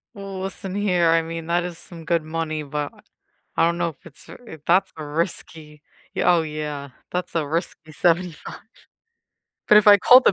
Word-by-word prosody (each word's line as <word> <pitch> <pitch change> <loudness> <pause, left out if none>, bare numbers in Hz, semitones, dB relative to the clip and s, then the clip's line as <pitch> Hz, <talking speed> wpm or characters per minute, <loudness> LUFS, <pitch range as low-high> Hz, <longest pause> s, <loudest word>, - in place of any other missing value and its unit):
Well, 195 -1 -7
listen 195 0 -5
here, 180 -5 +2
I 165 0 +4
mean, 165 0 -6
that 175 +1 +1
is 175 -1 -6
some 165 -2 -10
good 170 -1 +1
money, 155 -1 -3
but 145 0 -4 0.6
I - - +4
don't 170 0 +1
know 170 -1 0
if 155 - -16
it's 160 -4 -14 0.2
if 160 -7 -10
that's 185 +2 +3
a 155 - -6
risky 150 -1 -4 0.3
yeah, 180 - +3
oh 165 - +2
yeah, 150 -2 -5 0.2
that's 180 -1 -3
a 155 -3 +1
risky 155 0 -4
75, 170 +1 0 1.1
but 210 - +9
if 210 - +2
I 205 -1 +10
call 250 +6 +8
the 205 - +4
165 Hz, 185 wpm, -23 LUFS, 155-180 Hz, 1.1 s, I